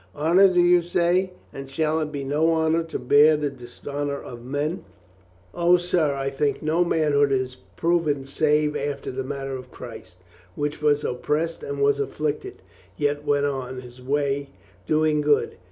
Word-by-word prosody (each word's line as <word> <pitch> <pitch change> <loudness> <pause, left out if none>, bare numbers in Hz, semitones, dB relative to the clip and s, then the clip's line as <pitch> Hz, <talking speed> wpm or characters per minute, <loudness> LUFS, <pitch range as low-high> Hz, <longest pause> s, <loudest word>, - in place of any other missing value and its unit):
Honor, 170 +6 +5
do 180 - +2
you 175 0 +5
say? 175 +2 +1 0.2
And 135 0 -8
shall 155 +3 0
it 155 -1 -3
be 140 -2 -4
no 150 +4 +1
honor 160 0 +2
to 165 - -4
bear 145 +5 +5
the 145 -1 -2
dis 125 -2 -14
honor 145 0 -2
of 120 -1 -10
men? 145 +7 -3 0.7
O, 175 +1 +4
sir, 175 -5 +1
I 135 0 -2
think 140 +2 -1
no 160 +3 +2
manhood 150 -4 +2
is 130 -1 -1 0.2
proven 165 -5 +1
save 150 +1 +1
after 145 -1 -3
the 130 +1 -4
manner 135 0 -4
of 130 -1 -9
Christ, 115 -8 -11 0.4
which 145 +1 -3
was 150 -1 +2
op 125 - -3
pressed 165 +3 -1
and 140 0 -5
was 140 0 +3
afflicted, 150 - -3 0.3
yet 145 0 -1
went 145 -1 +2
on 130 -2 -3
His 125 0 -13
way 140 +1 -1 0.4
do 155 0 +2
ing 150 -1 +2
good. 145 0 +1
145 Hz, 175 wpm, -24 LUFS, 135-160 Hz, 0.7 s, Honor